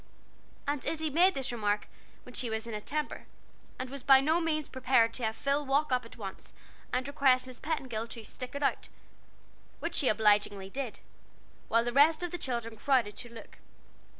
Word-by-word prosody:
Aunt 285 -2 -1
Izzie 315 -1 -1
made 360 +6 +5
this 265 -2 -1
remark 210 -3 -1 0.4
when 250 - -13
she 245 -2 -2
was 220 0 -2
in 230 - -6
a 210 - -4
temper, 300 +6 -3 0.5
and 255 - -4
was 275 -1 -6
by 270 +1 +7
no 315 +5 +2
means 310 -3 -1
prepared 250 -3 +3
to 245 - -4
have 220 0 0
Phil 280 +4 0
walk 280 +1 +1
up 250 -1 +1
at 230 - -13
once 195 -4 -7 0.4
and 250 +1 -1
request 270 -3 +3
Miss 255 -1 -9
Petingill 260 -7 -3
to 230 -1 -7
"stick 250 +5 -8
it 285 - -3
out," - - 0 0.9
which 335 +1 -3
she 280 - +2
obligingly 205 -3 +3
did; 260 -3 -4 0.7
while 230 +1 +3
the 240 0 -2
rest 310 +5 +5
of 350 - -3
the 355 - -4
children 235 -5 -3
crowded 235 -4 +2
to 240 - -6
look. 230 - -12
255 Hz, 190 wpm, -31 LUFS, 230-285 Hz, 0.9 s, by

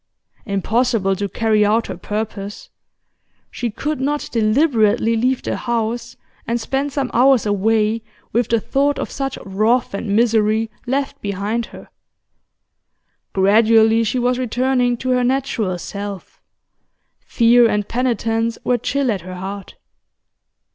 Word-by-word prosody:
Impossible 205 0 +1
to 200 +1 -3
carry 220 -1 +2
out 220 +2 +2
her - - -5
purpose; 205 -1 -5 0.8
she 240 - -3
could 285 +5 -3
not 290 +2 -1
deliberately 225 -1 +2
leave 250 +3 0
the - - -2
house 235 0 -3 0.3
and 235 +1 0
spend 270 +4 -2
some 275 -2 -2
hours 255 -1 +4
away 215 +2 +1 0.3
with 235 0 +1
the 230 - +2
thought 280 +6 0
of - - -4
such 270 -1 -3
wrath 215 +5 +1
and 200 0 -2
misery 220 -1 +2 0.2
left 275 +2 -2
behind 205 +4 -2
her. - - -13 1.5
Gradually 220 +3 +4
she 225 +3 -1
was 250 0 +1
returning 250 0 +1
to 255 - -4
her 250 0 +2
natural 245 -7 -1
self; 200 +1 -7 0.8
fear 235 0 +4
and 210 -1 -1
penitence 230 -2 -1
were 245 -1 +1
chill 275 +1 0
at 195 -4 -3
her 185 +2 -8
heart. 195 +2 -7
230 Hz, 130 wpm, -19 LUFS, 210-250 Hz, 1.5 s, hours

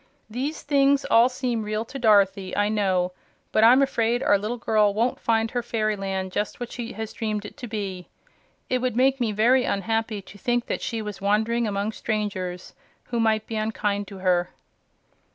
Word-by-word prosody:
"These 275 +7 -3
things 280 -1 +3
all 230 +2 +6
seem 250 -3 -2
real 215 +1 -2
to 270 +4 -8
Dorothy, 200 -4 +3
I 205 0 +2
know; 190 -4 +1 0.4
but 215 - +3
I'm 250 +4 +7
afraid 240 -1 0
our - - +4
little 215 +4 -3
girl 210 -3 +2
won't 235 +3 0
find 225 0 +1
her 245 - -1
fairyland 195 -5 -2
just 205 +5 -3
what 245 -1 -5
she 240 -1 -6
had 220 0 -6
dreamed 215 -2 -3
it - - -9
to 250 -4 -7
be. 195 -5 -5 0.6
It 255 - 0
would 250 -2 -1
make 265 +2 +3
me 230 -3 +1
very 240 +5 +3
unhappy 220 0 -1
to 205 +2 -14
think 240 +3 0
that - - -3
she 225 -3 -3
was 210 -2 -7
wandering 220 +3 +1
among 200 +1 -1
strangers 200 -5 -3 0.4
who 235 - 0
might 220 -1 +2
be 225 - -4
unkind 210 -2 -1
to 195 - -9
her." 180 -1 +1
220 Hz, 185 wpm, -25 LUFS, 205-240 Hz, 0.6 s, I'm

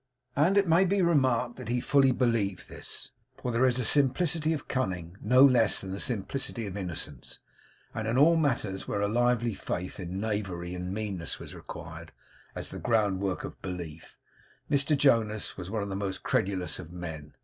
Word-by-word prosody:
And 170 +8 +4
it 200 -2 +4
may 165 +3 +5
be 195 0 +2
remarked 130 -8 +2
that 125 -3 -7
he 125 +1 +1
fully 135 +1 +4
believed 115 -6 0
this; - - -6 0.3
for 125 - -3
there 120 +3 +3
is 125 -1 +1
a 125 - 0
simplicity 150 +5 +2
of 155 -3 -3
cunning 90 -9 -2
no 130 +2 +7
less 125 -5 +4
than 95 -1 -5
a 100 - -4
simplicity 120 +1 -2
of 100 -2 -6
innocence; 85 -9 -5 0.6
and 110 0 -3
in 115 +3 +1
all 160 +5 +6
matters 120 -11 0
where 100 - -1
a 100 - +2
lively 120 +1 +2
faith 90 -1 -4
in 90 +1 -4
knavery 95 -5 -3
and 90 0 -4
meanness 100 -5 -3
was - - -8
required - - -9 0.4
as - - -4
the - - -6
ground 105 -5 +2
work 95 -2 -1
of - - -8
belief, 85 -4 -7 0.5
Mr 145 +1 +3
Jonas 115 -6 +2
was 90 -1 -7
one 110 0 -1
of 100 - -5
the 95 - -3
most 95 -1 -3
credulous 95 -3 0
of 85 -2 -9
men. 80 -4 -7
110 Hz, 185 wpm, -29 LUFS, 95-130 Hz, 0.6 s, no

